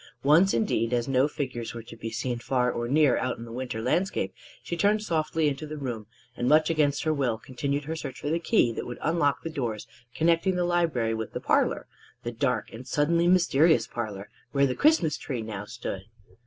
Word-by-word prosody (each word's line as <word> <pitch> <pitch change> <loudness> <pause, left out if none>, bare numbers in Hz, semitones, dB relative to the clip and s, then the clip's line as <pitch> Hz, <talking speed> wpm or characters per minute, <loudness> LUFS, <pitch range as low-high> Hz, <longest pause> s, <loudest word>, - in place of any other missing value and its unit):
Once, 165 +8 +5
indeed, 125 - 0
as 120 -1 0
no 135 +1 +3
figures 120 -6 -4
were 115 - -6
to - - -11
be 115 - -5
seen 120 +1 -3
far 125 0 +1
or 120 0 -3
near 145 -1 +4
out 125 -1 -2
on 115 - -8
the 115 - -10
winter 125 -1 -4
landscape, 190 +9 0 0.3
she 170 - -3
turned 205 +4 +2
softly 160 -3 0
into 145 +2 -2
the 155 +1 -6
room, 120 -7 -5 0.3
and 120 - 0
much 155 +2 +5
against 145 -3 +1
her 155 - +1
will 130 -6 0
continued 140 +5 -3
her 160 +3 -4
search 135 -5 -6
for 145 - -3
the 165 - +1
key 170 - +3
that - - -5
would 120 - -6
unlock 160 -3 +1
the - - -3
doors 120 -8 -3 0.3
connecting 170 +3 +2
the 180 -1 +1
library 165 -10 +1
with 110 -1 -4
the - - -3
parlor - - +1 0.4
the 120 - -3
dark 125 +2 -1
and 125 +3 -9
suddenly 170 +6 +2
mysterious 165 -7 +4
parlor 105 -4 -5 0.3
where 140 -1 +4
the 130 - 0
Christmas 230 - +3
Tree 125 -5 -4
now 105 -2 -6
stood. 105 -4 -5
140 Hz, 210 wpm, -27 LUFS, 120-160 Hz, 0.4 s, Once